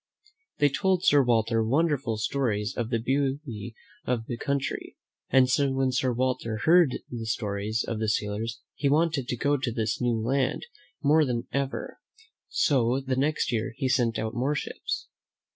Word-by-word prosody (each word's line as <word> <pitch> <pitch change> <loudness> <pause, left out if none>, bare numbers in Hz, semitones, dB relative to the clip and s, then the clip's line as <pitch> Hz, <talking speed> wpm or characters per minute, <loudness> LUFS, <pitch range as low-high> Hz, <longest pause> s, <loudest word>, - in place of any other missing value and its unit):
They 145 - +4
told 190 +4 +1
Sir 145 -1 +6
Walter 115 -2 +2
wonderful 135 -2 +1
stories 110 -1 -1
of 115 -2 -2
the 115 - +1
beauty 130 -2 -2 0.3
of 120 -3 -1
the 120 - -4
country, 140 +2 -3 0.3
and 130 0 +5 0.3
when 135 -1 +1
Sir 130 0 +1
Walter 125 -2 -1
heard 165 -5 +5
the 115 -2 -5
stories 105 0 -1
of 115 - -3
the 110 -1 0
sailors, 105 +2 -2
he 140 - 0
wanted 150 -3 +2
to 125 - -2
go 145 +4 +2
to 130 -3 -2
this 110 0 -2
new 120 -2 +1
land 130 - 0 0.4
more 155 +2 +5
than 120 -4 -1
ever; 140 -1 -3 0.5
so 130 -3 +2
the 135 -1 -2
next 145 0 0
year 115 +1 -1
he 135 - 0
sent 120 -3 +2
out 110 +1 -3
more 130 +5 0
ships. - - -4
125 Hz, 160 wpm, -27 LUFS, 115-140 Hz, 0.5 s, Sir